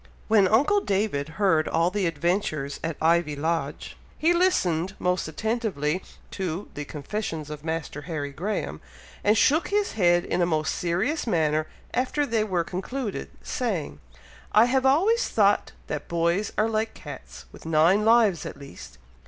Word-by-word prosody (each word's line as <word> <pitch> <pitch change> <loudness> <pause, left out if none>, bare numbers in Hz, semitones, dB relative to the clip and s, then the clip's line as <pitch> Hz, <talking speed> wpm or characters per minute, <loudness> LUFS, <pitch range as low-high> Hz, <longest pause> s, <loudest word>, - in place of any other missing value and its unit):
When 210 -3 +5
uncle 285 - +4
David 195 - -1
heard 175 -6 +3
all 165 +2 +1
the 200 -2 0
adventures 165 -3 -1
at 165 -2 -3
Ivy 165 -2 +2
Lodge, 155 -1 -3 0.2
he 330 +3 +3
listened 190 - +1
most 180 -2 0
attentively 190 - -1 0.3
to 185 0 -4
"the 145 - -5
confessions 155 0 -5
of 150 -1 -7
Master 160 -3 -4
Harry 145 -3 -3
Graham," 190 +10 -3 0.4
and 210 +2 +4
shook 305 +9 +3
his 410 0 0
head 175 -4 +3
in - - -1
a - - +4
most 155 -2 0
serious 205 - -1
manner 155 -5 +1 0.3
after 260 +4 0
they 225 -4 +1
were 185 -5 0
concluded, 195 - -4
saying, 70 0 -3 0.5
"I 215 +2 +7
have 260 +2 +2
always 395 - +3
thought - - +2
that - - -5
boys 170 +4 0
are 215 - +3
like 220 0 -1
cats, - - -10
with - - -12
nine 165 +6 +4
lives 220 -7 +4
at - - -7
least! 140 - -11
180 Hz, 150 wpm, -25 LUFS, 155-220 Hz, 0.5 s, I